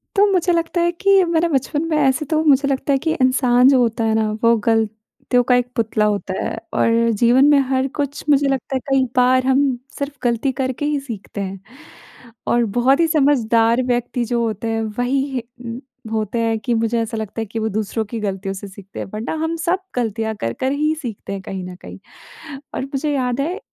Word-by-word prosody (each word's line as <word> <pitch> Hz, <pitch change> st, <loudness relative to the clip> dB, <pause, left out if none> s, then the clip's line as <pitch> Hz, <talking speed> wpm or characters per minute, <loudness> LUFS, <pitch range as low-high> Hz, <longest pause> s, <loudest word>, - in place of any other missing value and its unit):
तो 405 Hz, +1 st, +5 dB
मुझे 360 Hz, -1 st, +2 dB
लगता 335 Hz, +1 st, 0 dB
है 345 Hz, 0 st, +2 dB
कि 390 Hz, +2 st, +3 dB
मेरा 335 Hz, 0 st, +1 dB
बचपन 290 Hz, +2 st, 0 dB
मैं 310 Hz, -, +1 dB
ऐसे 280 Hz, +4 st, +1 dB
तो 310 Hz, +2 st, 0 dB
मुझे 280 Hz, -2 st, +4 dB
लगता 275 Hz, +1 st, 0 dB
है -, -, +3 dB
कि 320 Hz, -, +2 dB
इंसान 255 Hz, -1 st, +4 dB
जो 265 Hz, -2 st, +5 dB
होता 230 Hz, -1 st, +1 dB
है 220 Hz, 0 st, +1 dB
ना 220 Hz, -1 st, +1 dB
वो 230 Hz, 0 st, +5 dB
गलतियों 225 Hz, +2 st, 0 dB
का -, -, +7 dB
एक 245 Hz, 0 st, +1 dB
पुतला 220 Hz, -2 st, +1 dB
होता 200 Hz, -2 st, -4 dB
है -, -, -3 dB, 0.2 s
और 230 Hz, 0 st, +2 dB
जीवन 250 Hz, +4 st, +5 dB
में 290 Hz, -, +6 dB
हर 265 Hz, 0 st, +1 dB
कुछ 285 Hz, 0 st, -2 dB
मुझे 280 Hz, -1 st, +4 dB
लगता 270 Hz, 0 st, -2 dB
है 260 Hz, -, +1 dB
कई 270 Hz, -1 st, +4 dB
बार 255 Hz, +1 st, +4 dB
हम 265 Hz, +1 st, +3 dB, 0.4 s
सिर्फ़ 285 Hz, 0 st, -4 dB
गलती 240 Hz, +2 st, +1 dB
करके 260 Hz, +2 st, -2 dB
ही 295 Hz, -1 st, 0 dB
सीखते 215 Hz, -6 st, -7 dB
हैं। 195 Hz, 0 st, -5 dB, 0.9 s
और 240 Hz, 0 st, +3 dB, 0.2 s
बहुत 270 Hz, +5 st, +4 dB
ही 330 Hz, -, +4 dB
समझदार 250 Hz, -6 st, +3 dB
व्यक्ति 245 Hz, 0 st, -1 dB
जो 240 Hz, 0 st, -1 dB
होते 225 Hz, 0 st, -3 dB
हैं 225 Hz, 0 st, -1 dB, 0.2 s
वही 265 Hz, 0 st, -1 dB, 0.7 s
होते 220 Hz, +1 st, -1 dB
हैं 225 Hz, -1 st, +1 dB
कि 240 Hz, +2 st, -1 dB
मुझे 230 Hz, +1 st, 0 dB
ऐसा 225 Hz, 0 st, -4 dB
लगता 220 Hz, +1 st, -4 dB
है 225 Hz, -, -2 dB
कि 225 Hz, +2 st, -4 dB
वो 220 Hz, 0 st, -1 dB
दूसरों 220 Hz, +1 st, -2 dB
की 225 Hz, +2 st, -5 dB
गलतियों 195 Hz, -1 st, -3 dB
से 200 Hz, +1 st, -8 dB
सीखते 195 Hz, 0 st, -11 dB
हैं -, -, -3 dB
वरना 220 Hz, +7 st, -3 dB
हम 325 Hz, +1 st, -1 dB
सब 345 Hz, +3 st, 0 dB, 0.2 s
गलतियाँ 225 Hz, -2 st, -2 dB
कर-कर 190 Hz, -, -1 dB
ही 305 Hz, +2 st, +1 dB
सीखते 220 Hz, -4 st, -6 dB
हैं 195 Hz, -, -5 dB
कहीं 190 Hz, -1 st, -5 dB
न 180 Hz, 0 st, -8 dB
कहीं। -, -, -10 dB, 0.8 s
और -, -, -2 dB
मुझे 290 Hz, +2 st, -1 dB
याद 250 Hz, -1 st, 0 dB
है 355 Hz, +8 st, -2 dB
245 Hz, 205 wpm, -20 LUFS, 225-280 Hz, 0.9 s, का